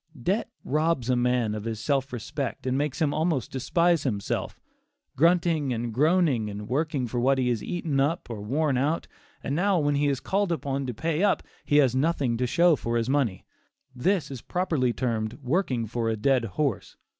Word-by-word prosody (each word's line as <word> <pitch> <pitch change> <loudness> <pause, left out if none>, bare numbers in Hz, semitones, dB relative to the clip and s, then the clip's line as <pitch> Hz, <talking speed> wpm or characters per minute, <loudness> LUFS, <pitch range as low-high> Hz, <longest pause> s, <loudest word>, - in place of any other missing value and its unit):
Debt 195 - 0
robs 150 -3 0
a - - +3
man 125 -3 +1
of 105 0 -5
his 110 -2 -3
self 135 +2 0
respect, 125 +3 -4
and 130 0 0
makes 145 +3 -1
him 150 -3 +1
almost 155 -6 0
despise 170 +5 +2
himself. 105 -8 -3 0.6
Grunting 165 -2 +2
and 115 0 -3
groaning 150 -5 +2
and 105 0 -7
working 140 +1 -1
for 120 +1 -3
what 135 +3 +3
he 125 -1 +1
has 115 -4 -1
eaten 165 -6 -2
up 155 +6 0
or 115 -3 -6
worn 135 +4 0
out, 150 +5 0 0.4
and 140 - -2
now 195 +3 +2
when 145 -2 +1
he 145 +1 +2
is 140 -2 0
called 200 -1 0
upon 140 -3 -2
to 125 - -3
pay 160 - -1
up, 205 -1 +2 0.2
he 145 - +3
has 130 -4 +4
nothing 135 -4 +1
to 125 +1 0
show 170 +5 +4
for 120 -3 -2
his 115 +3 0
money; 125 -10 0 0.5
this 155 +3 0
is 130 -4 -6
properly 160 -9 0
termed 115 -3 -2
"working 130 -4 0
for 115 +1 -2
a 110 - -1
dead 125 +2 +2
horse." 125 +2 -2
135 Hz, 190 wpm, -26 LUFS, 120-160 Hz, 0.6 s, has